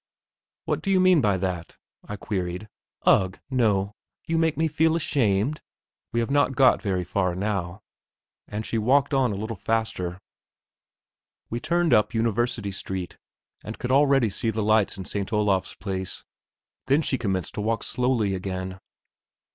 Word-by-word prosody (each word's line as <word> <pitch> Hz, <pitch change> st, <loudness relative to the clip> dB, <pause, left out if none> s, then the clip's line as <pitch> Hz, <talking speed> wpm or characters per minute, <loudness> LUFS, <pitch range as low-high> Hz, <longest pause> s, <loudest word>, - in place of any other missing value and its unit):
"What -, -, -1 dB
do 195 Hz, -, -3 dB
you 190 Hz, -1 st, +4 dB
mean 185 Hz, -4 st, +5 dB
by 100 Hz, -3 st, +2 dB
that?" 90 Hz, -3 st, -4 dB, 0.3 s
I 105 Hz, -, -6 dB
queried. 95 Hz, -1 st, -4 dB, 0.4 s
"Ugh, 95 Hz, -1 st, +3 dB
no; 105 Hz, -5 st, +1 dB, 0.3 s
you 165 Hz, -1 st, 0 dB
make 160 Hz, -1 st, +1 dB
me 160 Hz, +1 st, +2 dB
feel 160 Hz, +1 st, +2 dB
ashamed.... 135 Hz, -4 st, +1 dB, 0.5 s
We 115 Hz, -, +1 dB
have 115 Hz, -, -2 dB
not 140 Hz, -2 st, +2 dB
got 130 Hz, -2 st, +5 dB
very 95 Hz, -4 st, -1 dB
far 90 Hz, 0 st, -1 dB
now"; 95 Hz, -2 st, -3 dB, 0.6 s
and 105 Hz, +1 st, -4 dB
she 115 Hz, -, -1 dB
walked 140 Hz, +6 st, +3 dB
on 130 Hz, -4 st, +3 dB
a -, -, -3 dB
little 110 Hz, +3 st, -4 dB
faster. 95 Hz, -4 st, -2 dB, 1.3 s
We 120 Hz, -, -2 dB
turned 170 Hz, 0 st, +1 dB
up 105 Hz, +2 st, +3 dB
University 115 Hz, -2 st, 0 dB
Street, 95 Hz, -1 st, -5 dB, 0.4 s
and 110 Hz, +2 st, -7 dB
could 125 Hz, -, -3 dB
already 135 Hz, -5 st, +4 dB
see 115 Hz, -, -1 dB
the 110 Hz, -1 st, -1 dB
lights 110 Hz, -2 st, +2 dB
in 95 Hz, -, -6 dB
St. 100 Hz, +2 st, -4 dB
Olav's 105 Hz, -3 st, +1 dB
Place. 95 Hz, -2 st, -5 dB, 0.6 s
Then 140 Hz, +4 st, +3 dB
she 130 Hz, -, 0 dB
commenced 95 Hz, -6 st, -2 dB
to -, -, -3 dB
walk 115 Hz, +2 st, -1 dB
slowly 125 Hz, -6 st, 0 dB
again. 95 Hz, 0 st, -4 dB
110 Hz, 155 wpm, -25 LUFS, 95-130 Hz, 1.3 s, mean